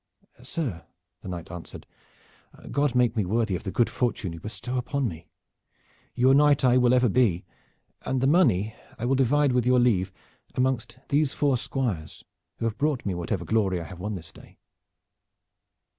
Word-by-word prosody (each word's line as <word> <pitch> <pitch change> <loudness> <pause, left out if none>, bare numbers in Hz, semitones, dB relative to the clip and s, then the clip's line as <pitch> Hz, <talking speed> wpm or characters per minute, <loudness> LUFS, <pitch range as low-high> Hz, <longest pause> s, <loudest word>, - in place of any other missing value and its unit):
"Sir," 125 - -4 0.4
the - - -10
knight 85 -2 -6
answered, 90 -2 -9 0.9
"God 145 -3 +1
make 125 -2 +3
me 110 - +1
worthy 105 +1 0
of - - -4
the 95 - -5
good 115 +5 +2
fortune 115 -8 -2
you 85 - -8
bestow 125 +6 -4
upon 140 +1 -1
me. 85 -4 -8 0.9
Your 130 +2 +4
knight 145 0 +4
I 125 0 +5
will 125 0 +4
ever 125 0 +4
be, 100 -6 +2 0.6
and 130 - -1
the 130 - +1
money 110 - +3 0.2
I 120 - -3
will 130 - +2
divide 135 +2 +3
with 125 -1 +2
your 125 0 +5
leave 100 -6 +2 0.4
amongst 130 -1 -1
these 145 -1 +2
four 140 -3 +2
squires 115 - -3 0.3
who - - -3
have 110 -1 -2
brought 145 -3 0
me 100 - -1
whatever 85 +1 -3
glory 95 -1 +1
I - - -5
have 95 0 -10
won 105 +3 -3
this 85 -2 -8
day." - - -17
120 Hz, 175 wpm, -26 LUFS, 95-130 Hz, 0.9 s, I